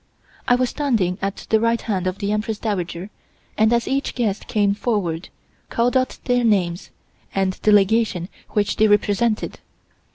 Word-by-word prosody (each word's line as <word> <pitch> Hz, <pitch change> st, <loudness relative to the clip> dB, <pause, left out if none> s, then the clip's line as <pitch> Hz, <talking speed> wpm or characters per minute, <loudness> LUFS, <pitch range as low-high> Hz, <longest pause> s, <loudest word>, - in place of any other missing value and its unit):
I 245 Hz, -, +5 dB
was 250 Hz, 0 st, 0 dB
standing 220 Hz, -12 st, 0 dB
at 195 Hz, 0 st, -3 dB
the 220 Hz, -, +5 dB
right 230 Hz, +1 st, +2 dB
hand 190 Hz, -5 st, -2 dB
of 185 Hz, +1 st, -2 dB
the 200 Hz, 0 st, -2 dB
Empress 215 Hz, +1 st, -1 dB
Dowager 190 Hz, -3 st, -3 dB, 0.4 s
and 220 Hz, +1 st, +3 dB
as 235 Hz, 0 st, +1 dB
each 275 Hz, +1 st, -1 dB
guest 215 Hz, -5 st, -1 dB
came 205 Hz, -3 st, +2 dB
forward, 195 Hz, -7 st, -2 dB, 0.4 s
called 240 Hz, +2 st, +1 dB
out 255 Hz, 0 st, +1 dB
their 245 Hz, -1 st, +1 dB
names, 185 Hz, -6 st, +1 dB, 0.5 s
and 190 Hz, -1 st, +1 dB
the 215 Hz, -, +3 dB
Legation 205 Hz, -3 st, +3 dB, 0.2 s
which 205 Hz, -1 st, 0 dB
they 220 Hz, -, +5 dB
represented. 210 Hz, +2 st, +1 dB
210 Hz, 160 wpm, -21 LUFS, 195-235 Hz, 0.5 s, I